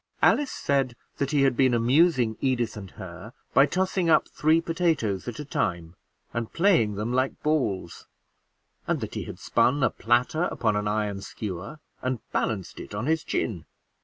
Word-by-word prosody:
Alice 290 -2 +4
said 135 -3 0 0.2
that 140 - -1
he 145 -2 +3
had 135 -2 +3
been 130 -1 +3
amusing 125 -1 +3
Edith 120 -4 0
and 100 -3 -8
her - - -10 0.2
by 135 +2 +6
tossing 185 +2 0
up 160 - +4
three 155 +2 +2
potatoes 165 - 0
at 120 - -5
a 150 - -6
time, 85 - -2 0.4
and 115 -1 -3
playing 165 - +3
them 110 +4 -2
like 130 +1 0
balls; 115 - -1 0.8
and - - +1
that - - -5
he - - -4
has - - -8
spun 135 +3 +2
a - - +3
platter 125 +8 +1
upon 110 -10 0
an 105 0 -1
iron 105 -1 -1
skewer 100 - -6 0.2
and 130 0 -1
balanced 100 -5 -2
it - - -8
on 105 +4 -2
his 160 +1 +1
chin. 90 -8 -2
125 Hz, 170 wpm, -26 LUFS, 105-150 Hz, 0.8 s, by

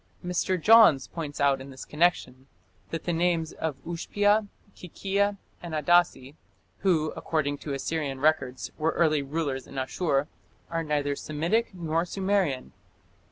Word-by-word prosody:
Mr. 180 +1 0
Johns 215 - +7
points 150 -4 -6
out 140 -2 +3
in 135 - -9
this 130 -1 -9
connection 150 -5 0 0.4
that 165 - -4
the 175 - -1
names 165 -1 +1
of 160 -4 -4
Ushpia, 205 +5 +1 0.3
Kikia, 200 +3 -1 0.2
and 170 -2 -5
Adasi, 155 -3 +2 0.5
who, 160 -5 +1
according 145 -3 -1
to 145 - -5
Assyrian 140 -1 -3
records, 130 -4 0
were 160 +1 +1
early 155 -3 +2
rulers 140 -2 -3
in - - -12
Asshur, 135 +2 0 0.5
"are 165 0 -1
neither 145 -2 -1
Semitic 170 +11 -1
nor 165 -1 -1
Sumerian". 190 -7 -1
160 Hz, 135 wpm, -27 LUFS, 140-175 Hz, 0.5 s, Johns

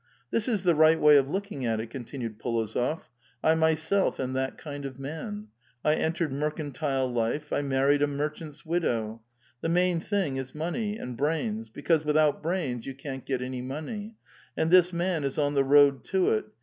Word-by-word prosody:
This 230 - +1
is 215 -6 0
the 175 -2 +4
right 160 +1 +5
way 150 0 +7
of 135 -1 +2
looking 195 -5 -3
at 115 -2 0
it," 110 +1 -6
continued 120 -3 -6
P61ozof. 115 +6 -1 0.4
"I 160 - +5
myself 160 +4 +2
am 130 0 -2
that 130 0 -2
kind 145 -2 -7
of 135 -2 -6
man. 205 +10 -6 0.4
I 150 - +5
entered 160 -2 -1
mercantile 145 -2 -1
life; 120 +5 -2
I - - +1
maiTied 140 +1 +2
a 145 - +4
merchant's 150 +1 -5
widow. 115 -10 -1 0.4
The 165 - -1
main 180 0 +2
thing 180 -7 -1
is 130 +1 -6
money, 205 +7 -2
and 125 - -6
brains, 165 - -1
because 160 -3 +1
without 150 -1 +2
brains 155 -9 -2
you 135 - -5
can't 135 -1 -7
get 130 -2 -1
any 130 0 -4
money. 180 - -6 0.4
And 160 - +1
this 180 -1 +6
man 170 -2 -1
is 140 -1 -2
on 145 -1 +1
the 140 -1 +3
road 140 -1 +5
to 190 -1 +2
it. 110 - +1
150 Hz, 185 wpm, -28 LUFS, 135-165 Hz, 0.4 s, way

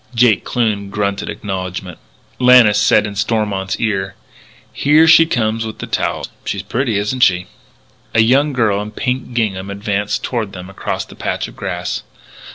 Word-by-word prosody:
Jake 115 -3 +4
Kloon 105 -5 -1
grunted 100 -1 -2
acknowledgment. 95 -3 -5 0.4
Lannis 125 -5 +6
said 105 0 +4
in 105 - -5
Stormont's 100 -2 -1
ear: 95 -4 -1 0.6
"Here 150 +3 +4
she 165 0 +7
comes 115 -5 0
with 110 -1 -6
towels. - - -1 0.2
She's 100 - -3
pretty, 115 +1 -1
isn't 105 +6 -2
she?" 90 -5 +4 0.7
A 115 - +6
young 135 +6 +3
girl 110 -6 +1
in 105 - -6
pink 125 +2 -3
gingham 100 -5 -1
advanced 100 0 -2
toward 110 -5 -3
them 90 0 -9
across 95 - -4
the - - -14
patch - - -3
of - - -14
grass. - - -4
105 Hz, 155 wpm, -17 LUFS, 100-120 Hz, 0.7 s, she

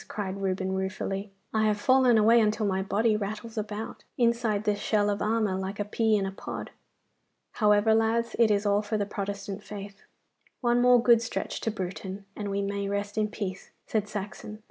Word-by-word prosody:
cried 195 -1 -4
Reuben 190 0 -1
ruefully. 195 +1 -3 0.2
'I 220 - +2
have 210 -1 +1
fallen 255 0 +5
away 225 +2 +6
until 215 0 +1
my 190 -1 0
body 215 +3 +1
rattles 215 +2 -4
about, 215 0 -5
inside 235 -3 +1
this 210 -1 0
shell 205 -1 +1
of 200 0 -3
armour, 215 -2 +1
like 190 +2 -4
a 205 - 0
pea 220 +1 +2
in 195 - 0
a 195 - -3
pod. 195 - -7 0.8
However, 210 0 +4
lads, 225 +1 +1
it 230 -2 +6
is 205 0 +2
all 205 0 +3
for 215 +1 -2
the 205 - 0
Protestant 200 0 -5
faith.' 200 -1 -9 0.6
'One 240 -1 +2
more 250 0 +6
good 235 -2 +6
stretch 235 - -4
to - - 0
Bruton, 195 0 -5
and 205 -1 -4
we 200 0 -1
may 200 0 -2
rest 200 0 -2
in 215 -1 +1
peace,' 195 -3 -5 0.2
said 210 -2 -1
Saxon. 210 +1 -6
210 Hz, 190 wpm, -28 LUFS, 200-220 Hz, 0.8 s, away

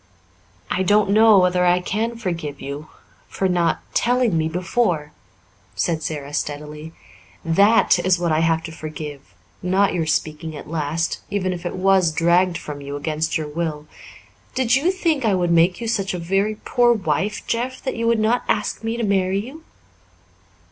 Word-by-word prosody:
"I 185 - 0
don't 205 +1 +3
know 215 0 +6
whether 180 -1 +3
I 180 0 +4
can 220 +6 -2
forgive 165 -9 -4
you 140 +2 -6 0.4
for 190 - -1
not 175 -3 +1
telling 245 -5 +2
me 160 0 +1
before," 175 -3 -1 0.6
said 165 -2 0
Sara 145 -2 -5
steadily. 150 +2 -5 0.5
"That 200 +4 +4
is 180 +1 +2
what 170 -1 -1
I 155 - +2
have 165 0 +1
to 165 - -7
forgive 150 - -8 0.3
not 190 +2 +2
your 165 -3 -1
speaking 155 +1 -2
at 145 - -9
last, 160 +1 -2
even 190 -2 -1
if 175 0 -5
it - - -5
was 185 -2 +3
dragged 170 +2 +2
from 145 -1 -7
you 140 0 -6
against 155 +2 -1
your 155 -1 -4
will. 150 -1 -4 0.7
Did 255 -2 +2
you 290 +7 +2
think 335 -7 0
I 215 -4 +2
would 175 -2 0
make 170 +2 +3
you 235 - -4
such 195 -5 -1
a - - -3
very 195 +5 0
poor 240 +2 +2
wife, 195 0 -2
Jeff, 250 +3 -2
that 265 - -2
you 230 0 -1
would 230 0 +3
not 225 +3 +2
ask 210 +1 -1
me 225 +1 -2
to 235 - -2
marry 195 -2 +1
you?" 265 +10 -6
180 Hz, 175 wpm, -21 LUFS, 160-210 Hz, 0.7 s, know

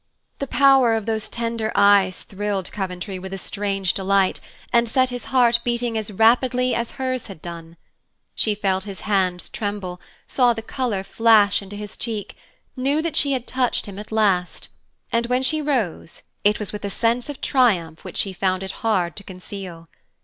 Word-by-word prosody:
The 275 - -3
power 270 -4 +5
of 220 -2 -2
those 220 -1 -2
tender 230 -1 -2
eyes 200 -2 +4
thrilled 200 -1 -3
Coventry 190 -1 -4
with 190 +1 -6
a - - -5
strange 195 -2 -2
delight, 195 0 +1 0.3
and 235 -1 +4
set 255 +2 +2
his 245 0 -5
heart 240 -3 +4
beating 240 -1 -1
as 220 -1 -2
rapidly 245 +4 +3
as 235 0 -2
hers 255 -2 -3
had 195 -6 -10
done. 170 0 -9 0.6
She 215 -2 0
felt 190 -2 0
his 200 -2 -7
hands 185 -4 0
tremble, 200 -4 -4 0.2
saw 245 -2 +3
the 225 -1 -6
color 230 -6 -2
flash 215 -1 +4
into 200 +1 -9
his 205 -1 -7
cheek, 220 -4 -5 0.4
knew 280 +4 +1
that 335 - -2
she 280 -1 +2
had 255 -2 -2
touched 255 -2 0
him 200 -1 -8
at 210 - -9
last, 195 -5 +1 0.4
and 235 0 +1
when 250 +1 +1
she 310 +3 +1
rose 240 - -2 0.2
it 210 +1 +4
was 210 -1 -4
with 210 - -6
a 200 - -2
sense 235 +5 0
of 290 - -6
triumph 185 - +1
which - - -8
she 195 - 0
found 185 0 0
it 190 - -4
hard 185 -7 +1
to 200 - -7
conceal. 185 -3 -9
210 Hz, 180 wpm, -22 LUFS, 190-240 Hz, 0.6 s, power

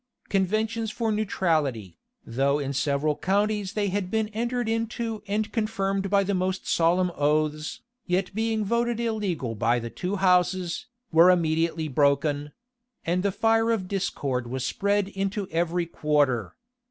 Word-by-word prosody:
Conventions 215 +3 0
for 225 +1 -1
neutrality, 155 - -1 0.3
though 135 +4 +1
in 140 -1 -3
several 140 +2 0
counties 205 +2 0
they 205 -2 0
had 190 -1 -2
been 220 +1 0
entered 235 +2 -2
into 225 0 -2
and 210 +2 -1
confirmed 195 -3 -1
by 200 0 +3
the 200 +1 -1
most 185 0 -1
solemn 175 +2 +2
oaths, 150 +1 0 0.3
yet 180 +1 0
being 220 0 0
voted 235 +2 0
illegal 200 - -2
by 115 +2 +1
the 115 -1 -5
two 185 +3 -3
houses, 180 +1 +1 0.2
were 165 +2 +7
immediately 165 -2 +1
broken;[*] 145 +1 +1 0.5
and 175 +2 +1
the 200 +1 +1
fire 225 +3 +2
of 215 -5 0
discord 140 -10 -2
was 130 +1 -3
spread 200 +3 +1
into 195 0 -2
every 170 +1 0
quarter. 145 -7 0
185 Hz, 140 wpm, -26 LUFS, 150-210 Hz, 0.5 s, were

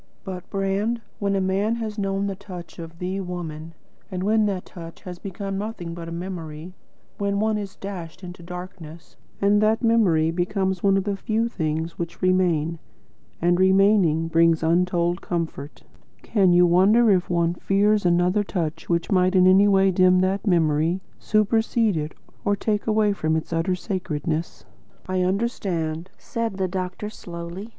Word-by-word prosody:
But, 185 -2 -7
Brand, 200 +4 -1 0.2
when 200 -1 0
a - - +2
man 195 +4 +1
has 220 -2 -4
known 195 0 -1
the 200 -1 -2
touch 180 -5 -10
of 165 0 -9
THE 185 +3 -3
Woman, 165 -3 -6 0.3
and 185 -2 -4
when 215 +1 +3
that 190 -3 -3
touch 165 -2 -11
has 180 -1 -8
become 195 0 -5
nothing 200 -6 -5
but 170 -1 -7
a - - -8
memory; 170 -1 -6 0.5
when 200 0 0
one 220 +1 +1
is 200 -2 -5
dashed 185 -3 -8
into 175 -1 -9
darkness, 175 -2 -9 0.2
and 205 +1 +3
that 220 +3 +2
memory 185 -9 +3
becomes 190 +1 -1
one 195 -1 +3
of 195 - 0
the 200 0 -1
few 220 +4 -1
things 160 -5 -3
which 170 -1 -5
remain, 170 -3 +1 0.6
and, 175 +1 +2
remaining, 190 -4 +4
brings 165 0 +3
untold 175 +1 +1
comfort, 160 -4 -4 0.4
can 195 -4 +3
you 175 0 +6
wonder 205 +6 +5
if 180 -2 +2
one 170 -1 +1
fears 205 +3 +2
another 180 +3 +2
touch 170 -6 -4
which 170 +2 0
might 185 0 +3
in 185 -1 +6
any 190 +2 +6
way 195 -1 +4
dim 185 0 +4
that 190 +3 0
memory, 165 0 +2 0.2
supersede 220 0 +2
it, 155 0 -3 0.3
or 205 - +2
take 210 +1 -2
away 215 -1 +3
from 160 -4 0
its 160 +1 -3
utter 165 +3 +1
sacredness?" 165 -3 -3 0.4
"I 185 0 0
understand," 180 -5 -1
said 230 -4 -3
the 190 -1 0
doctor 185 +3 -4
slowly. 175 +2 -8
185 Hz, 160 wpm, -24 LUFS, 170-200 Hz, 0.6 s, you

